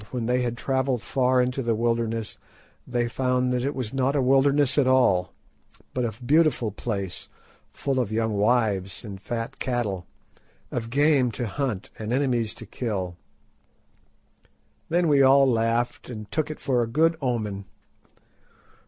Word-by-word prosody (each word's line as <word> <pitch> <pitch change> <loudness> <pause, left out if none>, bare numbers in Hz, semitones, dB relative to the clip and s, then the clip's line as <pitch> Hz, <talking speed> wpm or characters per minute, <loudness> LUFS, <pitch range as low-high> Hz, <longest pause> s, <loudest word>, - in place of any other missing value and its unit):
when 125 -3 -3
they 125 +2 +1
had 120 -1 -2
travelled 130 -2 0
far 130 +1 +2
into 125 +2 -2
the 115 -2 0
wilderness 115 -1 -1 0.5
they 120 -1 0
found 125 0 0
that 125 -1 0
it 140 +2 -2
was 125 -3 -4
not 135 +1 +1
a - - +3
wilderness 135 +1 +3
at 135 - +3
all, 100 -9 +3 0.6
but 125 - -1
a 115 +1 -4
beautiful 140 -5 +3
place 100 -3 -4 0.4
full 135 -2 -1
of 115 -4 -1
young 110 0 0
wives 105 -2 +1
and 100 -3 -8
fat 115 +1 -5
cattle, 110 -8 -2 0.6
of 115 -1 -3
game 140 -1 +3
to 120 +2 -4
hunt 115 -3 -3
and 110 +1 -4
enemies 125 -4 0
to 115 - -9
kill. 95 -6 -3 1.7
Then 175 +1 +2
we 145 -2 +4
all 135 +1 +6
laughed 120 0 0
and 105 -3 -8
took 155 -1 -1
it 155 - -6
for 125 -3 +1
a 115 - 0
good 160 +7 +2
omen. 105 -6 -2
120 Hz, 155 wpm, -25 LUFS, 110-130 Hz, 1.7 s, all